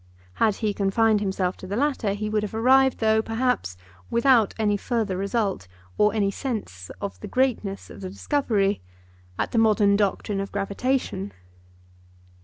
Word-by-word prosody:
Had 215 Hz, -3 st, +4 dB
he 215 Hz, -1 st, -1 dB
confined 210 Hz, +2 st, +2 dB
himself 190 Hz, -2 st, -1 dB
to 185 Hz, -, -9 dB
the 200 Hz, -, -3 dB
latter 260 Hz, -6 st, 0 dB
he 210 Hz, +1 st, -3 dB
would 210 Hz, 0 st, 0 dB
have 210 Hz, +1 st, -5 dB
arrived, 265 Hz, +3 st, +4 dB
though, 220 Hz, 0 st, +3 dB
perhaps, 225 Hz, -, -1 dB, 0.3 s
without 235 Hz, -2 st, +3 dB
any 210 Hz, -2 st, +1 dB
further 215 Hz, -2 st, -1 dB
result 200 Hz, -, -1 dB, 0.3 s
or 210 Hz, 0 st, +3 dB
any 200 Hz, -2 st, +1 dB
sense 200 Hz, -, -5 dB
of 200 Hz, -1 st, -5 dB
the 210 Hz, -, -7 dB
greatness 220 Hz, -5 st, -1 dB
of -, -, -11 dB
the 185 Hz, -, -5 dB
discovery, 205 Hz, -3 st, 0 dB, 0.6 s
at -, -, -2 dB
the 230 Hz, -, +2 dB
modern 210 Hz, -2 st, +4 dB
doctrine 200 Hz, 0 st, 0 dB
of 195 Hz, -, -4 dB
gravitation. 200 Hz, 0 st, -2 dB
210 Hz, 155 wpm, -24 LUFS, 195-230 Hz, 0.6 s, Had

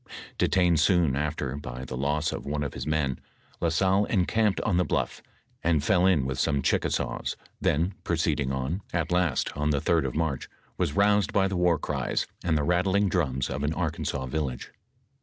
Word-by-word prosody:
Detained 90 Hz, -3 st, +3 dB
soon 80 Hz, -4 st, +3 dB
after 75 Hz, -2 st, -2 dB
by 65 Hz, -2 st, -7 dB
the 65 Hz, -, -6 dB
loss 75 Hz, +4 st, 0 dB
of -, -, -5 dB
one 75 Hz, +1 st, -2 dB
of 70 Hz, -, -4 dB
his -, -, -5 dB
men. 75 Hz, -4 st, 0 dB, 0.4 s
La 85 Hz, -, +1 dB
Salle 95 Hz, +4 st, +2 dB
encamped 105 Hz, +1 st, +1 dB
on 85 Hz, -, +1 dB
the 90 Hz, -, +4 dB
bluff, -, -, -2 dB, 0.4 s
and 80 Hz, -3 st, +2 dB
fell 90 Hz, +2 st, +3 dB
in 80 Hz, -8 st, +3 dB
with 65 Hz, 0 st, -3 dB
some 70 Hz, -2 st, +1 dB
Ohickasaws, -, -, 0 dB, 0.3 s
then 85 Hz, +6 st, +1 dB
proceeding 80 Hz, -5 st, 0 dB
on, 65 Hz, +8 st, -2 dB
at 85 Hz, -1 st, -1 dB
last, 90 Hz, -6 st, +1 dB
on 75 Hz, +1 st, 0 dB
the 70 Hz, -2 st, +2 dB
Sd -, -, +2 dB
of -, -, -5 dB
March, 80 Hz, -5 st, -1 dB, 0.3 s
was -, -, -1 dB
roused 100 Hz, -1 st, +3 dB
by 95 Hz, -1 st, +3 dB
the 95 Hz, -, -3 dB
war 90 Hz, -2 st, +3 dB
cries, 70 Hz, -3 st, -2 dB, 0.2 s
and 80 Hz, -3 st, +2 dB
the 75 Hz, -, 0 dB
rattling 95 Hz, +5 st, +2 dB
drums 70 Hz, -7 st, 0 dB
of 70 Hz, +1 st, -4 dB
an 75 Hz, +2 st, -1 dB
Arkansas 75 Hz, -5 st, -2 dB
village. 65 Hz, -2 st, -3 dB
80 Hz, 185 wpm, -27 LUFS, 70-90 Hz, 0.4 s, the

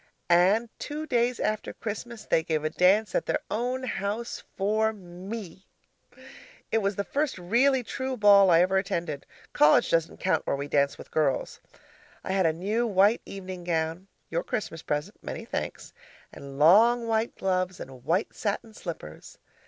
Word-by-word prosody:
And 195 Hz, +7 st, +4 dB
two 300 Hz, +1 st, -5 dB
days 245 Hz, -3 st, +1 dB
after 215 Hz, 0 st, -2 dB
Christmas, 225 Hz, +1 st, -6 dB
they 160 Hz, -, +2 dB
gave 160 Hz, -2 st, -2 dB
a 155 Hz, -, -1 dB
dance 190 Hz, +4 st, +3 dB
at -, -, -1 dB
their -, -, +1 dB
own 250 Hz, +4 st, -1 dB
house 220 Hz, 0 st, -3 dB, 0.2 s
for 215 Hz, +3 st, +1 dB
ME. 190 Hz, 0 st, -9 dB, 1.0 s
It 225 Hz, -, +3 dB
was 200 Hz, -1 st, -1 dB
the 200 Hz, -, -1 dB
first 285 Hz, +3 st, -1 dB
really 245 Hz, +9 st, +2 dB
true 260 Hz, +2 st, -4 dB
ball 200 Hz, -2 st, +7 dB
I 170 Hz, -1 st, +6 dB
ever 190 Hz, +2 st, +3 dB
attended 170 Hz, -6 st, -4 dB, 0.3 s
college 150 Hz, +1 st, +5 dB
doesn't 165 Hz, 0 st, +1 dB
count 185 Hz, -, 0 dB
where -, -, +1 dB
we 140 Hz, +1 st, -4 dB
dance 140 Hz, -1 st, +1 dB
with -, -, -12 dB
girls. 145 Hz, -4 st, 0 dB, 0.6 s
I -, -, -4 dB
had 190 Hz, -3 st, +2 dB
a -, -, +3 dB
new 210 Hz, +9 st, -1 dB
white 205 Hz, +2 st, +3 dB
evening 185 Hz, -2 st, -7 dB
gown 165 Hz, +2 st, -2 dB, 0.2 s
(your -, -, -1 dB
Christmas 210 Hz, -10 st, -4 dB
present 150 Hz, -1 st, -4 dB
many -, -, -6 dB
thanks) -, -, -5 dB, 0.4 s
and 140 Hz, -1 st, -10 dB
long 225 Hz, +10 st, +5 dB
white 225 Hz, +1 st, 0 dB
gloves 185 Hz, -1 st, -1 dB
and 130 Hz, -2 st, -10 dB
white 170 Hz, +8 st, 0 dB
satin 215 Hz, +1 st, -3 dB
slippers. 160 Hz, -, -9 dB
195 Hz, 160 wpm, -27 LUFS, 170-225 Hz, 1.0 s, ball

